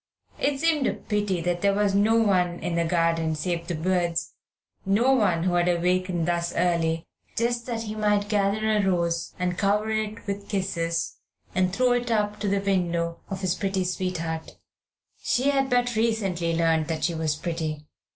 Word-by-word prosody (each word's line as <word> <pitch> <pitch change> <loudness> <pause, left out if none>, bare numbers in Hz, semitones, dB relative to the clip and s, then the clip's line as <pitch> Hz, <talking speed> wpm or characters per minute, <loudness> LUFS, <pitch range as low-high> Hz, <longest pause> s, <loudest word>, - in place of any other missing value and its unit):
It 280 -1 0
seemed 315 -3 +2
a - - 0
pity 205 -4 -1
that 175 +1 -1
there 200 0 +3
should 195 - -1
be 200 - +3
no 220 +2 +3
one 185 -6 +2
in 175 +1 -3
the 170 0 +1
garden 165 -1 +1
save 170 +2 -3
the 175 - -2
birds, 175 0 0 0.5
no 220 +7 +3
one 190 -10 +2
who 180 -1 +1
had 175 0 +3
awakened 180 0 +1
thus 170 0 -1
early 165 -2 +1 0.3
just 235 +1 0
that 230 -2 -2
he 215 -1 -5
might 210 -1 +1
gather 210 +1 +1
a 215 -1 +2
rose 170 -3 0
and 180 -1 -2
cover 210 +2 +1
it 215 0 -3
with 200 0 -5
kisses 170 -4 -1 0.4
and 185 0 +2
throw 250 +6 +2
it 245 0 0
up 210 -2 0
to 205 - -2
the 200 0 +2
window 175 -4 0
of 195 -1 -4
his 185 -2 +1
pretty 190 -1 -1
sweetheart. 175 -3 -3 0.6
She 265 +4 +2
had 270 -1 +1
but 245 -1 +1
recently 195 -7 0
learned 165 -1 +2
that 160 -2 -3
she 170 +3 +1
was 160 -2 -1
pretty. 155 -2 -4
185 Hz, 180 wpm, -25 LUFS, 170-210 Hz, 0.6 s, there